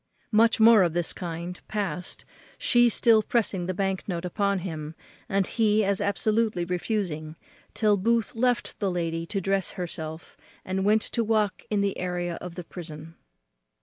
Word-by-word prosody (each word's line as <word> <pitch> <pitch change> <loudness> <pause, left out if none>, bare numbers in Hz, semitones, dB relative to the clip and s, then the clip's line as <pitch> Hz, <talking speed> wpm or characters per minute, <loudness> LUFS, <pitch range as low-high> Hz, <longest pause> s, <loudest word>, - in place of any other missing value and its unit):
Much 225 +1 +4
more 220 -1 +8
of 175 -3 +2
this 175 -1 -1
kind 175 0 -6
past, 200 -4 -3 0.3
she 240 0 +4
still 225 -1 +5
pressing 205 -5 0
the - - 0
bank 195 0 -1
note 175 -2 -3
upon 200 +2 0
him, 155 -3 -5 0.3
and 195 -1 +2
he 215 -1 +2
as 200 0 +1
absolutely 210 -2 +1
refusing, 175 -4 -2 0.4
till 210 -2 +3
Booth 230 +3 +1
left 245 +1 0
the 200 - 0
lady 165 -2 -2
to 200 - -2
dress 195 0 0
herself, 160 -2 -5 0.3
and 190 +1 -1
went 215 +1 +4
to 235 - -1
walk 215 -3 +1
in 210 -2 +1
the 200 -1 -1
area 175 -1 -2
of 180 -1 -7
the 180 - -6
prison. 160 -2 -9
195 Hz, 160 wpm, -26 LUFS, 175-215 Hz, 0.4 s, more